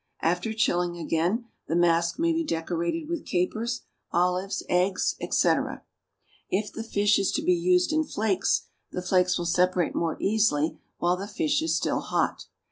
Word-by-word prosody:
After 175 +6 +1
chilling 175 -5 0
again, 175 +8 0 0.2
the 165 - -1
mask 170 -1 +2
may 335 +1 +2
be 330 +1 0
decorated 170 - -2
with 335 -1 -3
capers, 220 +7 -1 0.3
olives, 180 +2 0
eggs, 180 +2 +1
etc. - - +1 0.7
If 205 +2 -1
the - - -5
fish 205 -2 +2
is 195 - +1
to - - -1
be 180 - +4
used 180 - +2
in 315 0 +3
flakes, 215 -9 0 0.3
the 180 - -4
flakes 180 -1 +2
will 175 - -3
separate 180 0 +2
more 165 -2 -1
easily 195 -8 +1 0.2
while 175 +1 +1
the 195 +2 -5
fish 175 -7 0
is 160 0 +1
still - - 0
hot. - - -1
180 Hz, 160 wpm, -26 LUFS, 175-215 Hz, 0.7 s, be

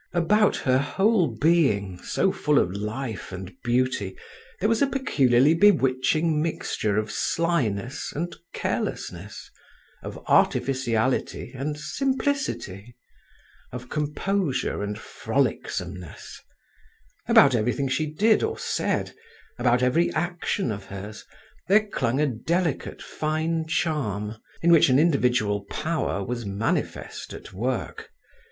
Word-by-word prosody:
About 205 +5 +3
her 130 -1 +2
whole 190 +6 +2
being, 110 - +1
so 190 - +1
full 150 -4 +1
of 90 - +3
life 110 +1 -4
and 95 0 -7
beauty, 120 -5 0 0.4
there 205 - +2
was 225 0 +1
a 280 - +5
peculiarly 145 - +3
bewitching 155 -3 +3
mixture 110 -9 -1
of 110 0 -1
slyness 130 -9 -1
and 170 +4 -4 0.2
carelessness, - - -4 0.5
of - - -7
artificiality 130 -2 +1
and 145 +3 -3
simplicity, 260 - -2 0.8
of 125 0 -8
composure 150 - -1
and 105 0 -3
frolicsomeness; 90 -4 -3 0.9
about 140 -2 +7
everything 125 +4 0
she 155 +4 0
did 215 +8 +3
or 445 0 -1
said, - - -1 0.5
about 120 0 +3
every 155 +7 +2
action 175 - -1
of 100 -2 -6
hers, 100 +2 -8 0.4
there 210 +3 +5
clung 130 - -1
a 150 - +3
delicate, 155 +5 -2
fine 160 +1 -2
charm, 110 - -1 0.3
in 170 - +5
which 165 -4 +6
an 130 - +5
individual 125 -10 +2
power 155 -10 -2
was 120 +1 -3
manifest 100 +2 -3
at - - -11
work. 120 +5 -3
135 Hz, 115 wpm, -25 LUFS, 110-165 Hz, 0.9 s, about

